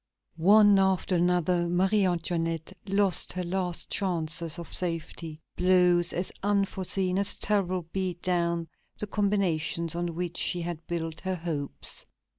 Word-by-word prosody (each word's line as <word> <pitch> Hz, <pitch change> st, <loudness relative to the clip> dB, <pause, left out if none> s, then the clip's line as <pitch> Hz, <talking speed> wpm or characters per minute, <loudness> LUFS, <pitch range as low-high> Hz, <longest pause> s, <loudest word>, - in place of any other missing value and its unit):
One 205 Hz, +3 st, +6 dB
after 190 Hz, -1 st, +1 dB
another, 175 Hz, 0 st, +2 dB
Marie 190 Hz, +3 st, +3 dB
Antoinette 165 Hz, 0 st, -2 dB
lost 195 Hz, -1 st, +1 dB
her 180 Hz, -, -3 dB
last 180 Hz, -1 st, -2 dB
chances 165 Hz, -3 st, 0 dB
of 170 Hz, -, -8 dB
safety; 165 Hz, -2 st, -4 dB, 0.2 s
blows 180 Hz, -1 st, +4 dB
as 180 Hz, +2 st, -2 dB
unforeseen 195 Hz, -2 st, 0 dB
as 200 Hz, 0 st, +1 dB
terrible 185 Hz, -4 st, 0 dB
beat 185 Hz, -2 st, -3 dB
down 170 Hz, -2 st, 0 dB, 0.3 s
the -, -, -3 dB
combinations 190 Hz, -6 st, 0 dB
on 170 Hz, -1 st, -3 dB
which 175 Hz, 0 st, -3 dB
she 175 Hz, -1 st, 0 dB
had 170 Hz, -1 st, -5 dB
built 165 Hz, -1 st, -3 dB
her 190 Hz, -1 st, -2 dB
hopes. 160 Hz, -5 st, -3 dB
180 Hz, 130 wpm, -28 LUFS, 170-190 Hz, 0.3 s, One